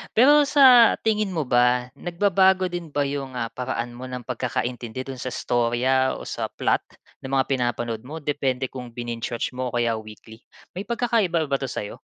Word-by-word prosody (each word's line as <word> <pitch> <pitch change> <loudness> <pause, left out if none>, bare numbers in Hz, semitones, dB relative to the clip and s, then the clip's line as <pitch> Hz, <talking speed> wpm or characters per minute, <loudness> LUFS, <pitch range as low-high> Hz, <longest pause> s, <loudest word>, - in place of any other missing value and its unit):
Pero 290 +6 +6
sa 260 -5 +7
tingin 210 -4 0
mo 155 - 0
ba, 125 0 +2
nagbabago 190 +1 +2
din 175 -3 -6
ba 145 - +2
yung, 140 -2 -5
ah, 115 -1 -3
paraan 120 -1 -4
mo 130 +1 -8
ng 125 -1 -6
pagkakaintindi 125 0 -3
dun 135 -2 -7
sa 130 - -5
istorya 125 +2 +1
o - - -8
sa - - -4
plot - - 0 0.4
ng 130 - -6
mga 130 - +3
pinapanood 120 -3 -1
mo, 160 +3 -6
depende 135 -3 -1
kung 125 -2 -8
bininge 120 0 -4
watch - - -2
mo 130 0 -2
o - - -6
kaya 115 -2 +1
weekly? 110 +1 -13 0.4
May 195 +4 -5
pagkakaiba 225 -8 +1
ba 140 -1 0
'to 135 - -3
sa'yo? 105 -4 -6
130 Hz, 185 wpm, -24 LUFS, 120-175 Hz, 0.4 s, sa